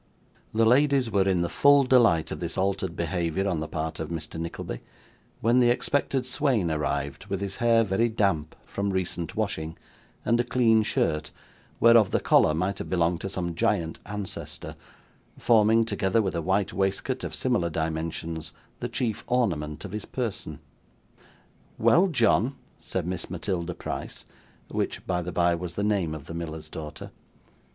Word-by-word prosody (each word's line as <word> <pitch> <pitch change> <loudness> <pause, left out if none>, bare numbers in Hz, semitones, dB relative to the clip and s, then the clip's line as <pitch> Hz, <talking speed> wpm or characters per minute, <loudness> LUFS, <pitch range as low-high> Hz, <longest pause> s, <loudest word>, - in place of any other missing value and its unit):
The 115 +1 +3
ladies 135 0 +4
were 100 -2 +2
in 90 -2 +2
the 85 - +1
full 140 +7 +5
delight 115 -11 +4
of - - -4
this - - -4
altered 95 -2 -1
behaviour 85 +3 -1
on 90 -5 0
the 80 - -3
part 80 0 -4
of 80 - -4
Mr. 80 -1 -5
Nickleby, 85 -7 -5 0.6
when 120 +3 +4
the 120 -1 +5
expected 135 +1 0
swain 130 - +1
arrived, 75 +3 -2
with 100 -1 -2
his 100 -1 -4
hair 115 -1 +4
very 110 +3 +1
damp 100 -9 0
from 100 0 -2
recent 90 -3 -2
washing, 100 -7 -2 0.5
and 120 +1 +3
a - - +3
clean 115 -2 +3
shirt, 75 -7 0 0.5
whereof 115 -4 +6
the - - +1
collar 75 - +4
might 90 +4 -1
have - - -5
belonged 85 -1 +1
to 95 - -3
some 90 -3 -3
giant 80 0 0
ancestor, 100 -1 -5 0.6
forming, 115 0 +4
together 100 0 +1
with 100 -4 0
a 85 - -1
white 95 +4 0
waistcoat 95 0 -1
of - - -3
similar 85 -1 +1
dimensions, 80 0 -3 0.3
the 120 - -3
chief 120 -3 -2
ornament 85 -11 -1
of 100 - -7
his 105 +1 -4
person. 120 -6 -4 1.2
'Well, 185 +3 +5
John,' 130 - +2 0.2
said - - -3
Miss 90 -1 -4
Matilda 90 -3 -3
Price - - -6 0.4
(which, - - -3
by 90 -1 0
the 90 +1 -5
bye, 85 0 +2
was 85 0 -5
the 100 - -1
name 100 -7 0
of 75 -2 -9
the - - -8
miller's 80 -2 -6
daughter). 75 -1 -8
95 Hz, 165 wpm, -26 LUFS, 85-115 Hz, 1.2 s, whereof